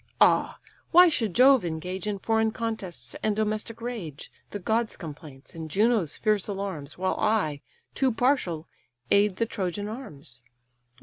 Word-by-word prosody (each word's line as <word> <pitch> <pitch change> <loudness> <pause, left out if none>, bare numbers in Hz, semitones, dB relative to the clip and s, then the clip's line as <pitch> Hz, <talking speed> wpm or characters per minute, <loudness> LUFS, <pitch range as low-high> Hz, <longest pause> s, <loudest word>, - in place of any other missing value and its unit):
ah, - - +4 0.3
why 360 +2 +8
should 230 - 0
Jove 260 -1 +6
engage 180 +4 -4
In 205 -1 -1
foreign 220 +2 +1
contests 215 - -5
and 215 -1 +1
domestic 215 +1 -2
rage, 205 - -6 0.2
The - - -5
gods' 220 +4 -1
complaints, 150 -4 -10
and 160 -1 -7
Juno's 205 -4 +2
fierce 210 -3 +1
alarms, 190 -8 -5
While 185 +1 -1
I, 185 -10 +1 0.3
too 265 -2 +2
partial, 220 - 0 0.4
aid 200 -1 +4
the 230 - 0
Trojan 205 -2 -3
arms? 150 - -9
205 Hz, 140 wpm, -27 LUFS, 165-225 Hz, 0.4 s, why